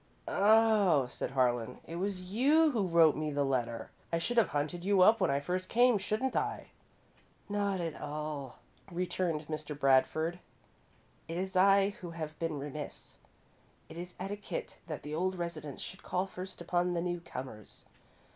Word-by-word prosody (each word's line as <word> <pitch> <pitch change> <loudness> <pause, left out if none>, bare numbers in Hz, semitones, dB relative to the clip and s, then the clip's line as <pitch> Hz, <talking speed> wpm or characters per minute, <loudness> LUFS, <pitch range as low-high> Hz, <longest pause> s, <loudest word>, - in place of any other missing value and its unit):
"Oh," 205 - +4
said 125 - -4
Harlan, 125 -2 +1
"it 165 - -6
was 190 0 -2
you 285 - +4
who 215 -7 0
wrote 165 -3 +5
me 155 0 -2
the 145 -1 0
letter. 120 -4 -2 0.2
I 165 - +2
should 240 +9 -2
have 225 -6 +6
hunted 150 +4 -2
you 195 0 +3
up 225 +4 +6
when 185 - +3
I 140 0 +2
first 185 +5 -3
came, 240 -2 +4
shouldn't 215 +7 -1
I?" - - -2 0.8
"Not 200 -2 0
at 165 -3 -3
all," 150 -2 -5 0.3
returned 175 -3 -1
Mr. 155 -1 -5
Bradford. 155 +6 +3 0.9
"It 165 +1 -4
is 190 +1 -3
I 195 +1 +5
who 175 - -6
have 155 -2 -6
been 165 -3 -2
remiss. 145 +1 -7 0.7
It 160 - -10
is 175 0 -8
etiquette 200 +2 -5
that 155 -3 -5
the 150 - -6
old 185 +4 0
residents 160 -5 -5
should 190 - -8
call 180 +1 -1
first 185 -1 -8
upon 175 +1 0
the 170 - 0
newcomers. 135 - -6
170 Hz, 160 wpm, -32 LUFS, 150-190 Hz, 0.9 s, have